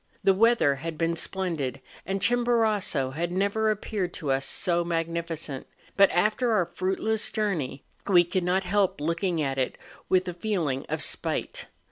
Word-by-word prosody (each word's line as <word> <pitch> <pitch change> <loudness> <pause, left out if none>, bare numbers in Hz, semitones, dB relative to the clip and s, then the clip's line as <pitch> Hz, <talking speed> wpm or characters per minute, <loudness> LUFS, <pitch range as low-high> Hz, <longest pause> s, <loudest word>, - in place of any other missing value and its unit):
The 195 0 +5
weather 215 -9 +4
had 160 +3 -5
been 165 +1 0
splendid, 165 -7 -2 0.3
and 195 0 -1
Chimborazo 220 - +2
had 170 +5 -2
never 200 +4 +1
appeared 205 -3 -2
to 150 -5 -2
us 135 0 0
so 175 -1 +1
magnificent; 165 -4 -3 0.3
but, 195 -1 +6
after 215 +6 +2
our 185 -5 +3
fruitless 190 +5 -1
journey, 165 -11 -2 0.2
we 180 -3 +6
could 175 +1 -1
not 185 +2 +1
help 195 -2 +1
looking 165 +1 0
at 135 -1 -1
it 130 - -1 0.3
with 185 0 +3
a 180 - -3
feeling 170 -8 -2
of - - -2
spite. - - -3
180 Hz, 155 wpm, -27 LUFS, 165-200 Hz, 0.3 s, but